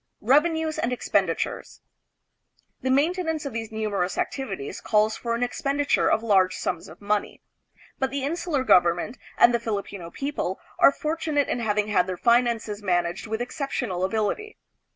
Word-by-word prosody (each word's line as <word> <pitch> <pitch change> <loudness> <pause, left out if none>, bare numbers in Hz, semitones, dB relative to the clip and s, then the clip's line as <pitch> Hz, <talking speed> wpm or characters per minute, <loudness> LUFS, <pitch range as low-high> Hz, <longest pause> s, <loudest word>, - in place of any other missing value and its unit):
Revenues 315 +5 +2
and 235 - 0
Expenditures. 250 - -1 1.0
The 260 - -1
maintenance 320 +3 +1
of 275 - -4
these 225 -1 -4
numerous 205 -4 -2
activities 195 - -3
calls 215 +1 +2
for 235 -1 -2
an 240 - -1
expenditure 280 +3 +1
of 220 - +2
large 190 -4 +3
sums 175 - -3
of 165 +5 -14
money, 205 0 -2 0.6
but 265 - +1
the 275 0 -3
insular 315 -1 -1
government 180 +2 +3 0.2
and 240 - +6
the 235 - +2
Filipino 200 -6 -4
people 275 -5 -3 0.2
are - - +8
fortunate 305 -1 -1
in - - -1
having 210 -2 0
had 180 -3 +2
their 185 -1 -3
finances 235 -2 +2
man 175 -3 +2
aged 175 +5 -5
with 220 +2 -2
exceptional 245 - -3
ability. 220 - -1
230 Hz, 150 wpm, -25 LUFS, 200-275 Hz, 1.0 s, are